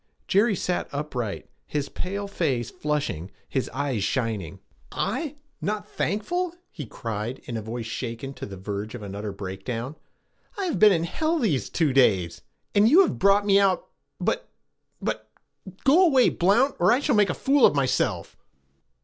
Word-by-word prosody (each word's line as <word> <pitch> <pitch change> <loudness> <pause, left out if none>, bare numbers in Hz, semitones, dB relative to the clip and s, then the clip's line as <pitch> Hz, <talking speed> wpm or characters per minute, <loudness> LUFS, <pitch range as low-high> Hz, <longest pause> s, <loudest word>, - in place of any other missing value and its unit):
Jerry 205 +2 +3
sat 180 0 -2
upright, 135 -7 -4 0.2
his 145 -2 -2
pale 200 +2 -4
face 135 - -1
flushing, 150 - -2 0.2
his 130 - -2
eyes 130 -5 -2
shining. 110 - -2 0.3
'I? 295 +1 -2 0.3
Not 210 +1 -2
thankful?' 350 - -2 0.2
he 145 -7 -7
cried 115 +3 -4
in 120 - -5
a 110 - -2
voice 115 +2 -5
shaken 115 +3 -5
to - - -7
the 100 -1 -8
verge 100 +4 -5
of 115 - -8
an 100 -1 -7
utter 105 +1 -4
breakdown. 100 +8 -5 0.6
'I 395 - -1
have 350 - -1
been 215 -1 +8
in 165 -3 +2
hell 315 - 0
these 205 - 0
two 155 -5 +1
days, 95 -10 +3 0.3
and 205 +2 +5
you 335 +9 +8
have 375 - +1
brought 200 +1 +4
me 200 -1 +5
out 195 -2 +2 0.3
but - - -1 0.5
but - - -3 0.5
go 310 +7 +6
away, 265 -5 +5
Blount, 230 +10 +3
or 180 - +5
I 245 - +4
shall - - +1
make 205 -3 +4
a 180 - -1
fool 275 -1 +2
of - - +7
myself!' 135 -2 0
150 Hz, 165 wpm, -25 LUFS, -, 0.6 s, been